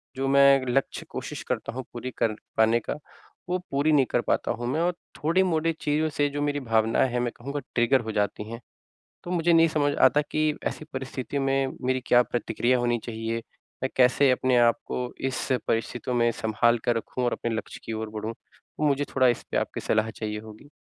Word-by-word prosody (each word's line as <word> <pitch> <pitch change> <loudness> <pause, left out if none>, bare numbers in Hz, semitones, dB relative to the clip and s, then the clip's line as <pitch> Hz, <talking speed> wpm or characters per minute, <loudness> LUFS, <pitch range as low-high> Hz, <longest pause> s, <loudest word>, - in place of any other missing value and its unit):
जो 135 0 -1
मैं 140 -1 +6
लक्ष्य 135 +2 -1
कोशिश - - -6
करता - - -2
हूँ 130 0 -4
पूरी 125 +1 -5
कर 115 -2 +1 0.2
पाने 110 +1 +4
का - - +1 0.6
वो 180 +1 +1
पूरी 145 +3 +2
नहीं 135 -3 +5
कर 120 - +2
पाता - - 0
हूँ 120 +1 -3
मैं 155 +6 0
और 175 +1 +2 0.2
थोड़ी 170 +5 +2
मोड़ी 165 -2 +1
चीज़ों 155 +1 +1
से 145 -1 0
जो 145 +1 -4
मेरी 145 0 0
भावनाएँ 115 +3 +3
हैं 125 - 0
मैं 120 -1 -1
कहूँगा 140 +4 -4 0.2
ट्रिगर 120 +2 +3
हो 110 -1 -5
जाती 105 0 -1
हैं। 115 - -6 0.6
तो 175 - -6
मुझे 170 -1 +2
नहीं 165 0 +6
समझ 145 -2 +1
आता 150 - +6
कि 155 0 +2 0.2
ऐसी 155 - -6
परिस्थिति 130 +1 -4
में 135 0 +1
मेरी 130 0 +1
क्या 120 0 +6
प्रतिक्रिया 120 +1 0
होनी 120 0 +1
चाहिए? 115 0 -3 0.5
मैं 130 - +1
कैसे 130 +2 +5
अपने 130 0 +2
आप 120 -1 +5
को 125 -1 -3 0.2
इस - - -3 0.2
परिस्थितियों 120 +2 -1
में 120 0 +3
संभाल 115 +2 +2
कर 120 - +2
रखूँ 125 +2 -3
और 120 - +1
अपने 120 - -3
लक्ष्य - - -6
की 115 - -4
ओर 110 0 -4
बढ़ूँ। 110 +1 -4
तो 155 - -11
मुझे 140 0 +1
थोड़ा 130 -1 +5
इस 120 - +1
पे - - +1
आपकी - - -2
सलाह 110 +1 +1
चाहिए 105 -1 -4
होगी। 110 +6 -13
130 Hz, 205 wpm, -26 LUFS, 115-145 Hz, 0.6 s, मैं